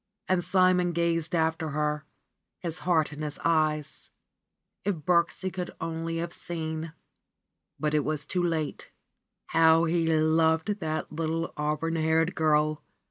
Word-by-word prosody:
And 185 -1 +2
Simon 185 -1 +3
gazed 170 0 0
after 160 -1 0
her, 150 0 -1 0.5
his 170 -1 -4
heart 160 -4 +1
in 150 - -8
his 150 -1 -3
eyes; 155 -2 0 0.7
if 205 -1 0
Birksie 170 +3 0
could 180 -1 -4
only 165 0 -3
have 170 +1 -3
seen. 160 -1 -5 0.9
But 150 0 0
it 150 -1 +2
was 150 0 -1
too 180 +3 -1
late! 160 -4 -2 0.6
How 165 0 +5
he 165 0 +1
loved 160 +4 +2
that 155 -3 -3
little 165 +1 -2
auburn 150 +2 -1
haired 160 +2 +2
girl 155 -2 +2
160 Hz, 135 wpm, -28 LUFS, 155-170 Hz, 0.9 s, How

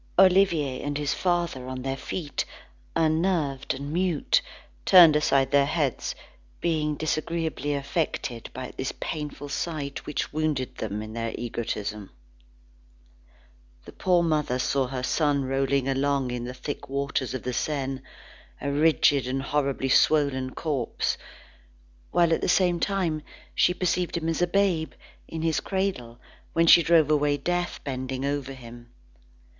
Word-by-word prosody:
Olivier 180 -8 +4
and 145 0 -2
his 145 -1 0
father 170 -8 -1
on 130 -1 -5
their 135 0 -2
feet, 150 +2 -3 0.5
unnerved 160 -5 +1
and 140 +3 -6
mute, 185 - +2 0.4
turned 175 -5 +8
aside 135 -3 +2
their 140 -1 +4
heads, 145 -5 -1 0.4
being 155 -3 0
disagreeably 155 -1 -2
affected 140 -4 -3
at 130 0 -6
this 130 - -2
painful 150 -2 -5
sight 145 -1 -4
which 150 - -3
wounded 150 -5 -1
them 105 -1 -3
in 110 0 -8
their 115 0 -3
egotism. 105 -4 -4 1.8
The - - -10
poor 180 -2 +2
mother 150 -6 +1
saw 130 +1 +1
her 130 0 -4
son 145 0 +1
rolling 135 0 +1
along 135 -1 +1
in 120 -1 -3
the 125 - -5
thick 145 +1 -6
waters 140 -2 -2
of 130 - -5
the 125 - -3
Seine, 135 -1 -2 0.6
a 140 - -2
rigid 145 -3 +3
and 135 +1 -2
horribly 135 -2 0
swollen 130 -3 +3
corpse; 145 -7 -1 0.9
while 170 -1 +3
at - - 0
the - - 0
same 180 -1 +3
time, 175 -5 0 0.3
she - - +4
perceived 180 -1 0
him 165 -1 -2
a 175 - +3
babe, 180 -4 +1 0.3
in 160 -1 -5
his 165 -1 +1
cradle, 190 - -2 0.4
when 165 0 +3
she 170 - +8
drove 160 -2 +4
away 145 -1 +2
death 175 +4 -2
bending 130 -1 -3
over 140 -1 -2
him. 120 -2 -12
145 Hz, 140 wpm, -26 LUFS, 130-165 Hz, 1.8 s, turned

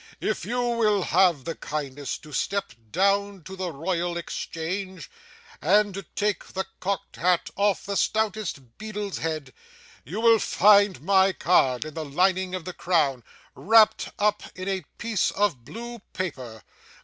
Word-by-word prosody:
If - - -2
you 245 - -2
will 230 -5 +2
have 170 -6 +3
the 165 - -2
kindness 145 -3 -4
to 155 -1 -14
step 200 0 -1 0.2
down 200 0 +1
to 190 +4 -8
the 185 -2 -3
Royal 170 +3 -2
Exchange 170 +1 -5 0.5
and 205 +4 +3
to 195 - -5
take 205 +3 -2
the 190 0 -4
cocked 195 -1 -3
hat 180 0 +1
off 200 -1 +1
the 200 - -3
stoutest 210 - -1
beadle's 210 -2 -4
head, 155 -5 -4 0.5
you 180 - -5
will 230 -1 +5
find 200 -7 +4
my 190 +1 +4
card 135 -8 +2
in 155 - -7
the 160 - -4
lining 185 +5 +1
of 180 -3 -6
the 180 - -5
crown, 150 -9 +1 0.3
wrapped 220 +1 +4
up 210 0 +2
in 185 +1 -6
a 190 -1 -2
piece 230 -5 0
of 185 - 0
blue 235 +1 -8
paper. 130 -12 -5
185 Hz, 150 wpm, -25 LUFS, 160-205 Hz, 0.5 s, will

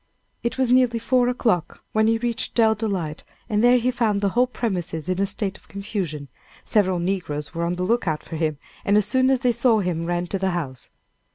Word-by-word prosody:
It 235 - -2
was 260 -2 +1
nearly 250 -2 +4
four 245 +2 +2
o'clock 225 -9 -1
when 220 0 +3
he 225 0 +3
reached 235 0 -2
Dell 225 -2 +5
Delight, 195 -8 -3 0.2
and 215 -1 +1
there 245 +1 +6
he 250 +1 +1
found 225 -4 +1
the 200 -1 +1
whole 245 +5 +2
premises 180 -10 -3
in 185 +1 0
a 200 - +2
state 200 0 -4
of - - -25
confusion. 190 -8 -4 0.4
Several 190 -4 +2
negroes 170 -5 -3
were 170 0 -1
on 170 - 0
the 180 - -2
lookout 185 -7 0
for 165 - -7
him; 155 -2 -1 0.3
and 200 +1 +3
as 210 - +3
soon 260 +5 +2
as 265 -2 +2
they 250 -2 +3
saw 235 0 +3
him 175 -4 -1
ran 175 0 -1
to 195 +2 -3
the 190 0 +1
house. 130 -7 -6
200 Hz, 215 wpm, -23 LUFS, 175-235 Hz, 0.4 s, there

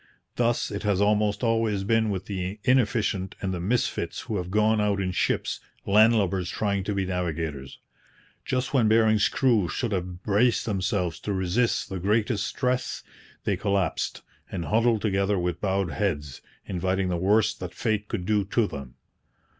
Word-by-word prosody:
Thus 120 -1 +1
it 100 - -4
has 105 -3 +1
almost 105 +2 +2
always 115 -4 +1
been 110 +1 +2
with 95 -2 -3
the 95 +1 -4
inefficient 110 -7 +1
and 95 -1 -2
the 90 - -3
misfits 110 +8 -1
who 110 - -3
have 90 -1 -4
gone 105 +2 +3
out 100 -1 +1
in 95 -1 -1
ships - - 0 0.3
land 110 +3 +5
lubbers 95 -3 0
trying 100 -1 -1
to 105 - -2
be 95 -1 0
navigators. 80 -7 -3 0.7
Just 130 +1 -2
when 125 -5 +4
Bering's 110 -1 +4
crew 115 -9 +2
should 120 +5 -2
have 90 -1 -4
braced 110 +3 +2
themselves 95 -4 -1
to 105 - -3
resist 95 +6 0
the 95 - -4
greatest 105 +2 +1
stress, 125 +1 -2 0.4
they 100 - +1
collapsed 100 -3 -1 0.3
and 85 -3 -4
huddled 115 0 +2
together 100 -1 +1
with 90 -1 -2
bowed 95 -3 0
heads, 75 -6 -2 0.2
inviting 95 +1 -1
the 90 - 0
worst 105 +3 +2
that 90 -1 -7
fate 110 -2 -1
could 90 - -3
do 105 0 +2
to 110 +3 +1
them. 70 -8 -8
100 Hz, 165 wpm, -26 LUFS, 95-110 Hz, 0.7 s, land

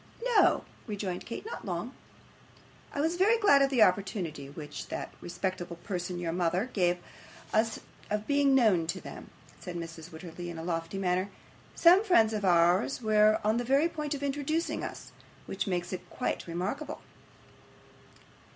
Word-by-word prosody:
'No,' 475 -5 +4 0.2
rejoined 200 -4 -4
Kate. 235 - -6
'Not 455 - -6
long.' - - -4 1.0
'I 285 - -2
was 325 +3 0
very 425 +5 +4
glad 285 -11 +5
of 275 - +4
the 250 -5 +5
opportunity 180 -7 0
which 150 +1 -8
that - - -5
respectable 175 0 -4
person, 180 0 -4
your 170 -1 -2
mother, 180 +7 0
gave 175 -3 +2 0.6
us 220 0 +2 0.3
of 210 0 -1
being 285 -1 +3
known 205 -10 +4
to 170 - -2
them,' - - -10 0.3
said 180 -2 -7
Mrs. 165 0 -7
Wititterly, 175 +1 -8
in 170 - -7
a 160 - -6
lofty 165 +1 -3
manner. 185 0 0 0.5
'Some 360 +4 +6
friends 225 - +4
of 210 -1 -2
ours 175 +5 +3
were 215 0 +4
on 215 +2 +2
the 240 - 0
very 275 +6 +3
point 300 -3 -3
of 285 - -6
introducing 290 +4 -1
us, - - -7 0.3
which - - -3
makes 175 -1 -2
it 185 - -7
quite - - -3
remarkable. 195 - -4
200 Hz, 160 wpm, -30 LUFS, 175-275 Hz, 1.0 s, Some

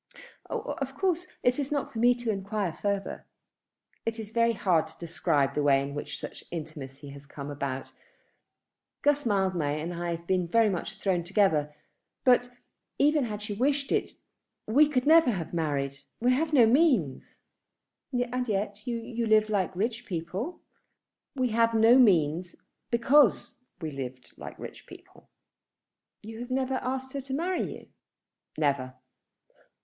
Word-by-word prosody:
"Of 275 - -4
course 365 0 0 0.2
it 245 +3 +2
is 280 0 -2
not 285 -2 -2
for 225 - -4
me 245 +1 +5
to 240 -2 -2
enquire 200 -2 -2
further." 200 +1 -3 0.8
"It 225 0 -2
is 215 -1 -7
very 230 0 +3
hard 170 -7 +2
to 160 - -16
describe 150 -4 0
the 150 - 0
way 140 -2 +4
in 140 0 -5
which 145 - -5
such - - -8
an - - -23
intimacy 145 -4 -7
has 140 0 -11
come 145 0 -7
about. 135 -2 -4 1.1
Guss 290 -2 +2
Mildmay 185 -8 +1
and 165 +3 -4
I 170 0 -2
have 170 +1 -11
been 180 -1 +1
very 225 +4 +4
much 195 +4 -4
thrown 185 -4 0
together; 165 -6 +1 0.5
but, 245 -1 +4 0.5
even 295 -1 +3
had 210 -2 -5
she 210 -1 -4
wished 275 +5 0
it, - - 0 0.5
we 285 +8 +5
never 300 +4 +5
could 245 - +2
have 170 -2 -5
married. 140 -4 -1 0.2
We 245 +2 +3
have 310 +4 0
no 260 -6 +6
means." 235 - +2 0.7
"And 250 -1 -1
yet 205 +3 -2
you 235 -1 -3
live 215 0 +4
like 190 -3 0
rich 225 +5 -2
people." 185 - -4 0.7
"We 255 -2 +1
have 230 0 +2
no 225 +3 +6
means 175 - +3 0.3
because 245 +2 +3 0.2
we 160 -3 -4
have 140 - -8
lived 130 -1 -7
like - - -9
rich - - -10
people." - - -16 0.9
"You 220 +1 -8
have 245 +1 -6
never 260 0 0
asked 260 +1 -3
her 280 - -3
to 265 0 -4
marry 355 +4 -1
you?" - - -10 0.7
"Never." 140 -4 0
215 Hz, 155 wpm, -28 LUFS, 165-250 Hz, 1.1 s, no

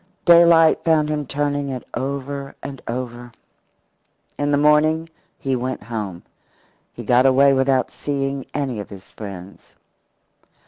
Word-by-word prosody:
Daylight 170 -2 +6
found 155 -2 +2
him 150 -2 -2
turning 145 0 -2
it 130 -2 -5
over 140 0 -4
and 135 -2 -7
over. 120 0 -5 1.0
In 145 0 -1
the 145 - +2
morning 155 +2 +3 0.3
he 135 -1 -2
went 130 -1 -4
home. 105 -6 -5 0.7
He - - -9
got 125 +2 +4
away 135 +1 +5
without 130 -1 +1
seeing 135 -2 -3
any 135 -6 -2
of 100 - -7
his 100 -1 -13
friends. 95 -3 -10
135 Hz, 130 wpm, -21 LUFS, 125-145 Hz, 1.0 s, Daylight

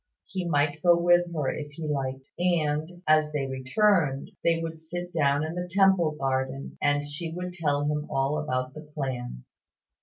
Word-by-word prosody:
He 185 -2 -4
might 145 0 +1
go 175 -1 +6
with 175 0 +4
her, 150 -5 -1
if 145 -1 -6
he 160 +2 -6
liked; 135 -2 -3
and 170 0 0
as 155 0 +4
they 145 -2 -1
returned, 135 +3 +1
they 165 -1 +3
would 165 -1 -5
sit 175 +2 -6
down 145 -2 +2
in 155 +1 -3
the 180 0 -4
Temple 190 -4 +4
Garden, 135 0 -2
and 145 0 +2
she 155 +3 -4
would 180 +1 -5
tell 145 -4 0
him 150 0 -1
all 135 +2 0
about 130 -2 -2
the 155 - -8
plan. 130 - -5
150 Hz, 175 wpm, -27 LUFS, 140-170 Hz, -, go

